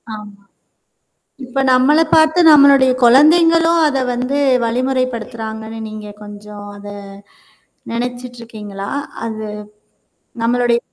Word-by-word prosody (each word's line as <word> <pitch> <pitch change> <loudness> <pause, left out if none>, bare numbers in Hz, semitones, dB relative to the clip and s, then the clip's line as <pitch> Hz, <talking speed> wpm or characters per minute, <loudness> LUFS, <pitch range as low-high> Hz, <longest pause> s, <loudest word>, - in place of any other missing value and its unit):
ஆமா. 205 -1 -13 1.0
இப்ப 255 +2 -4
நம்மள 265 +5 +3 0.2
பார்த்த 315 +2 +4
நம்மளுடைய 280 -3 +6
குழந்தைங்களும் 330 +6 +4
அத 275 -2 -1 0.2
வந்து 255 +3 -2 0.3
வழிமுறைப்படுத்துறாங்கன்னு 230 -3 -4
நீங்க 215 -1 -9
கொஞ்சம் 205 0 -11
அத 205 0 -12 1.0
நனச்சுட்டுருக்கீங்களா? 230 -4 -7 0.4
அது 220 -1 -6 1.0
நம்மளுடைய. 240 0 +1
245 Hz, 80 wpm, -16 LUFS, 220-275 Hz, 1.0 s, நம்மளுடைய